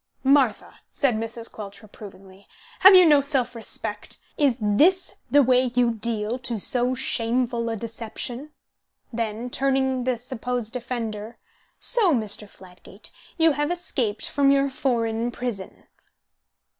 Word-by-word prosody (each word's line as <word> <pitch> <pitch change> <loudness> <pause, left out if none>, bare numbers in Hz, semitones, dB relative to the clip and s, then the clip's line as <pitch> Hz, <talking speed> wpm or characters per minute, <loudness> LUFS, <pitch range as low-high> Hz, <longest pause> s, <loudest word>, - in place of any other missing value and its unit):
"Martha," 265 -5 +2
said 275 -4 0
Mrs. 225 +1 -5
Quelch, 205 0 -10
reprovingly, 195 -2 -14 0.3
"have 385 +1 +9
you 365 -1 +8
no 295 -3 +5
self 275 -3 0
respect? 230 -2 -5 0.2
Is 280 -6 +2
this 300 - +2 0.2
the 285 +3 +5
way 255 0 +3
you 245 -1 +3
deal 225 +1 -3
to 240 -2 -3
so 250 +5 +2
shameful 235 -1 -1
a 225 - -2
deception?" 230 +5 -6 0.6
Then, 230 +1 -4
turning 265 -1 0
the 255 -2 0
supposed 245 -1 -4
offender, 230 -3 -5 0.4
"So, 415 - +2
Mr. 210 -2 -2
Fladgate, 190 +2 -14 0.3
you 325 -1 +4
have 295 +1 -1
escaped 260 -11 -2
from 280 0 +2
your 275 0 +2
foreign 235 -3 -1
prison." 240 -6 -6
240 Hz, 130 wpm, -24 LUFS, 225-270 Hz, 0.6 s, have